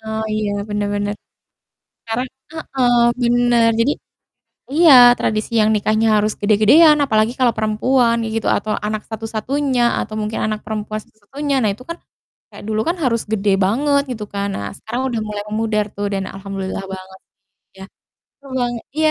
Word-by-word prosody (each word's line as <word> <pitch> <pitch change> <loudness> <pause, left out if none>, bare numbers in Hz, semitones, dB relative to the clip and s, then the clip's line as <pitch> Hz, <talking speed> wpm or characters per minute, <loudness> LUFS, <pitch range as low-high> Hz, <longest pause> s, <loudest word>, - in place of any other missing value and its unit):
Oh, 220 0 -4
iya 215 -1 -1 0.2
benar 205 -1 -2
benar. 205 0 -2 0.9
Sekarang 230 +3 -2 0.3
heeh, 265 -6 -1 0.3
benar. 240 -1 +3
Jadi 275 +6 +3 0.8
iya, 325 -1 +6 0.2
tradisi 215 +1 -2
yang 215 - +3
nikahnya 215 +2 +1
harus 210 +1 +1
gede-gedean 220 +10 +5
apalagi 220 -1 +1
kalau 245 -2 +3
perempuan 230 +3 +2
ya - - -3
gitu 225 - -2
atau 215 +2 -4 0.2
anak 215 0 -3
satu-satunya 240 +5 -2 0.2
atau 215 - -6
mungkin 215 +1 -3
anak 215 -1 -2
perempuan 215 0 -4
satu-satunya. 275 +7 -5
Nah, 215 - +2
itu 235 +5 -13
kan 335 - -5 0.6
kayak - - -11
dulu 215 0 0
kan 345 - 0
harus 230 -2 +1
gede 205 -1 +1
banget 280 +8 +2
gitu 215 -3 -6
kan. 200 0 -1
Nah, 100 - -4
sekarang 235 +3 -5
udah 230 -2 -2
mulai 210 -1 -4
memudar 215 -1 0
tuh 205 0 -2
dan 195 -1 -1
alhamdulillah 195 0 -5
banget 190 0 -12 0.6
ya. - - -8 0.6
Seru 280 -1 -15
bang 245 0 0 0.2
iya, 310 0 +3
220 Hz, 160 wpm, -19 LUFS, 210-245 Hz, 0.9 s, iya